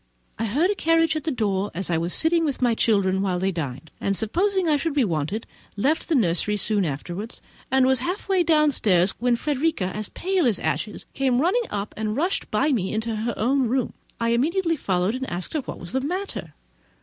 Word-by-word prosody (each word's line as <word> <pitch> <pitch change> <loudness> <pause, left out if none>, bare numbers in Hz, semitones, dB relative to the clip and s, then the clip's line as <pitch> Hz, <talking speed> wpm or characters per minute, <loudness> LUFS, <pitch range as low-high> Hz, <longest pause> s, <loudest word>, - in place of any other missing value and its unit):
I 225 - 0
heard 295 - +2
a - - +2
carriage 330 -3 +2
at 310 - -3
the 320 - 0
door, 205 -5 0
as 185 0 -2
I 165 - +2
was 170 +2 -2
sitting 330 - +3
with 290 -4 -1
my 245 -2 +3
children 200 -4 +2
while 190 -2 0
they 190 +2 0
dined; 150 -3 -5
and 195 - 0
supposing 365 - 0
I 305 - +4
should 295 +1 -1
be 280 - +4
wanted, 175 +3 -2 0.3
left 290 +12 0
the 325 - +3
nursery 210 -2 +1
soon 205 -1 +2
afterwards, 175 - -5 0.3
and 265 0 +4
was 265 -1 +3
half 360 - -3
way 385 -2 +3
downstairs, 285 - +3
when 245 0 +2
Frederica, 280 - -1
as 215 -1 -4
pale 370 -5 0
as 220 - +3
ashes, 210 - -3
came 260 -2 +1
running 430 - +2
up, 200 +1 -4
and 215 0 -2
rushed 355 +6 0
by 275 +8 +2
me 195 -8 0
into 220 +1 -2
her 225 +2 -2
own 260 +3 +2
room. 250 +1 0 0.3
I 230 0 +1
instantly 330 +7 +1
followed, 190 - 0
and 260 +1 -4
asked 175 +1 -4
her 310 - +1
what - - -7
was 170 - -8
the 265 - 0
matter. 365 +8 -4
235 Hz, 210 wpm, -24 LUFS, 200-310 Hz, 0.3 s, I